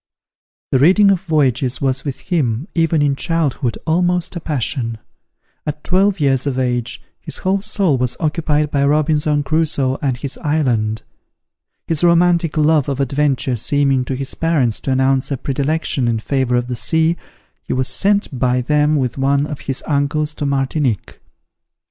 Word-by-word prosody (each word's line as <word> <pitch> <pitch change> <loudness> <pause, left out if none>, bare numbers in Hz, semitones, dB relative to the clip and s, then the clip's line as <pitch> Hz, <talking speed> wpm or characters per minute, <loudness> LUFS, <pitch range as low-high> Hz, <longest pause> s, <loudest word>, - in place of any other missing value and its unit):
The 130 - +3
reading 190 +7 +5
of 185 -3 +1
voyages 135 -7 +1
was 135 -1 -1
with 140 -3 -5
him, 140 -4 -1
even 165 -2 +2
in 140 -1 +1
childhood, 140 -7 -1
almost 175 +2 0
a - - -3
passion. 130 -6 -1 0.7
At 150 0 -5
twelve 195 +1 +2
years 135 -2 +1
of 135 -2 -1
age, 125 -2 -2 0.2
his - - -5
whole 190 +1 0
soul 195 - +1
was 125 -1 -1
occupied 150 -2 0
by 140 -1 +1
Robinson 150 0 +2
Crusoe 140 -3 0
and 135 -4 -1
his 140 +1 -4
island. 120 -8 0 0.8
His 165 0 -1
romantic 170 -2 +3
love 155 -2 +3
of 135 -1 -3
adventure 135 -1 0
seeming 135 +2 +1
to 130 - -3
his 135 +1 -4
parents 145 -9 0
to 135 - -3
announce 130 0 +1
a 140 - -2
predilection 140 -1 -1
in 115 -1 +1
favour 130 +2 -1
of 120 0 +1
the 125 0 -4
sea, 160 +6 +1 0.5
he - - -8
was 130 0 0
sent 200 -10 0
by 125 0 +1
them 150 +3 +2
with 130 -2 -1
one 140 +1 +2
of 150 -1 -6
his 135 -1 -4
uncles 150 +1 0
to 145 -1 -3
Martinique. 135 -4 -1
145 Hz, 160 wpm, -18 LUFS, 130-160 Hz, 0.8 s, reading